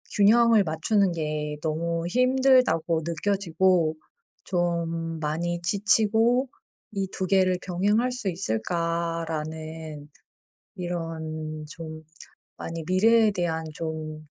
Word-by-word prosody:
균형을 225 +1 +5
맞추는 185 +4 +1
게 150 -2 -3
너무 165 +2 -2
힘들다고 250 -9 +3
느껴지고 170 -1 +1 0.5
좀 170 -2 -1
많이 170 +3 -2
지치고 220 +7 +2 0.4
'이 195 -2 -2
2 190 - -3
개를 185 -1 +3
병행할 205 +7 +1
수 245 -5 -3
있을까?'라는 160 - -3 0.7
이런 160 -3 -5
좀 160 -2 -8 0.5
많이 165 0 -5
미래에 220 +4 +4
대한 170 -4 -2
좀 155 -1 -5
170 Hz, 195 characters per minute, -26 LUFS, 160-200 Hz, 0.7 s, 균형을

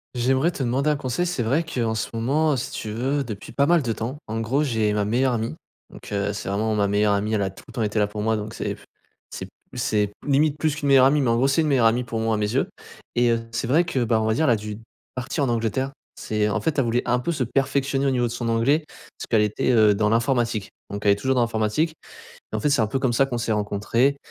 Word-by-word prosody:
J'aimerais 130 +6 +2
te 140 - -4
demander 130 +5 +1
un 150 - +2
conseil 135 +4 -2
c'est 170 -9 -1
vrai 140 +9 +1
qu'en 120 -7 -1
ce 110 - -2
moment, 145 +7 +1
heu, 135 - -1
si - - -4
tu 110 - -5
veux 135 +5 -1
depuis 105 -3 -7
pas 140 - +2
mal 170 +2 +4
de 120 -4 -2
temps 115 +4 -4
en 110 +1 -3
gros 125 +7 +1
j'ai 110 -6 +1
ma 105 -1 +1
meilleure 125 +5 +1
amie 115 -7 -2 0.4
donc, - - -12
heu, 100 0 0
c'est 105 - -6
vraiment 110 +3 0
ma 105 -1 +2
meilleure 105 +1 +2
amie. 105 +2 0
Elle 105 - +1
a 95 - -1
tout - - -15
le - - -12
temps 120 - -3
été 105 +1 0
là 105 - +3
pour 105 +1 -5
moi 110 +1 +1
donc 105 +2 -6
c'est - - -3
f - - -19 0.4
c'est - - -6
p - - -17 0.2
c'est 105 -5 0
limite 145 +1 +2
plus 155 0 0
qu'une 145 -1 -3
meilleure 135 -2 +6
amie 145 +2 +4
mais, 130 - +1
en 115 - +3
gros, 130 +3 +2
c'est 140 +4 +3
une 155 - 0
meilleure 130 -5 +3
amie 120 +2 +3
pour 115 -1 -3
moi, 115 -1 +1
à - - -1
mes 105 0 -1
yeux. 135 - +1 0.5
Et, 120 0 +3
heu 115 0 +1
c'est 115 0 -2
vrai 155 +8 +4
que, 135 -8 -1
bah, 110 -1 +2
on - - 0
va 110 - +2
dire, 160 +8 +1
elle 135 - +4
a - - +5
dû 105 0 -6 0.4
partir 130 +4 -2
en 130 - +1
Angleterre 120 +4 -1 0.3
c'est 105 -1 -1
en 105 - -1
fait 160 -3 0
elle 135 - +2
voulait 120 +1 +1
un 125 0 +2
peu 170 +7 -2
se 145 -5 -1
perfectionner 135 +2 0
au - - +3
niveau 125 -2 +1
de 115 - -2
son 120 0 -3
anglais 125 +7 +2
parce - - -12
qu'elle 110 -2 +4
était, 105 +3 +1
heu, 110 -3 +5
dans 105 +1 +1
l'informatique. 115 -2 +1 0.2
Donc 100 +1 -6
elle 100 - +6
est 100 - +3
toujours 130 +5 0
dans 125 - +3
l'informatique 115 +8 0 0.6
et 110 - 0
en - - -2
fait 110 - +1
c'est 140 -3 +3
un 110 - 0
peu 135 - -1
comme 130 -2 +1
ça 135 +3 +3
qu'on 125 -3 -3
s'est 115 -1 -1
rencontré, 105 +6 +1
120 Hz, 285 wpm, -23 LUFS, 110-135 Hz, 0.6 s, meilleure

